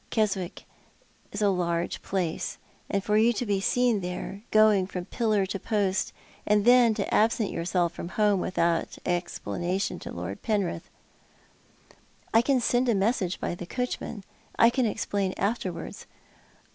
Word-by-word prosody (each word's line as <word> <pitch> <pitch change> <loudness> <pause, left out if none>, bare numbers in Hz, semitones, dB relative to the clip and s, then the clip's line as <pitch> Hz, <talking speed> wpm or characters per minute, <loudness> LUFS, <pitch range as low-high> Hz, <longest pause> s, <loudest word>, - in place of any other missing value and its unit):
Keswick 195 -5 -1 0.7
is 205 +1 -2
a 205 - +5
large 170 -2 -1
place— 180 -4 -2 0.3
and 200 -1 0
for 210 0 +2
you 225 +2 +5
to 245 - -2
be 200 -2 +1
seen 245 0 +2
there, 180 +2 -5
going 215 -3 +5
from 180 -2 -5
pillar 215 -4 +1
to 195 +1 -4
post— 200 -2 0 0.3
and 210 0 +2
then, 245 -2 +6
to 200 - -2
absent 220 -1 +2
yourself 170 0 0
from - - -6
home 205 0 +2
without 170 -2 0
exj)lanation 175 +1 -2
to - - -7
Lord 90 +3 -6
Penriih 200 -6 -1 0.8
" - - -31
"I 225 - +6
can 260 +1 +2
send 245 +1 +2
a 230 - +3
message 195 -3 0
by - - -2
the 175 0 -7
coachmau. 250 -4 -4 0.3
I 230 - +6
can 250 -1 +1
explain 200 -3 -1
afterwards." 190 -5 -3
200 Hz, 150 wpm, -27 LUFS, 180-220 Hz, 0.8 s, then